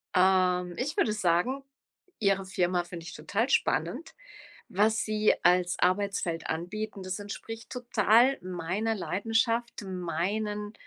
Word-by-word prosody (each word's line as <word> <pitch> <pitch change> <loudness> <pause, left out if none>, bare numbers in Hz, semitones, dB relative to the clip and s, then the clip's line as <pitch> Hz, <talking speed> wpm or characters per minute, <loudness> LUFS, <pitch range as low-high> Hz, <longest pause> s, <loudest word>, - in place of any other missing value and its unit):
Ähm, 180 -1 +3
ich 290 +5 -3
würde 215 - +2
sagen: 210 +8 +1 0.6
„Ihre 195 -2 +2
Firma 180 -1 0
finde 170 -1 -9
ich - - -8
total 205 - -1
spannend, 170 - 0 0.6
was 215 +3 +2
Sie 215 0 +3
als 180 0 +3
Arbeitsfeld 185 -2 0
anbieten. 195 +5 -4
Das 185 +2 -4
entspricht 225 +3 -8
total 245 +1 +3
meiner 185 +5 -2
Leidenschaft, 225 +4 0
meinen 200 +4 -3
200 Hz, 115 wpm, -29 LUFS, 180-220 Hz, 0.6 s, Ähm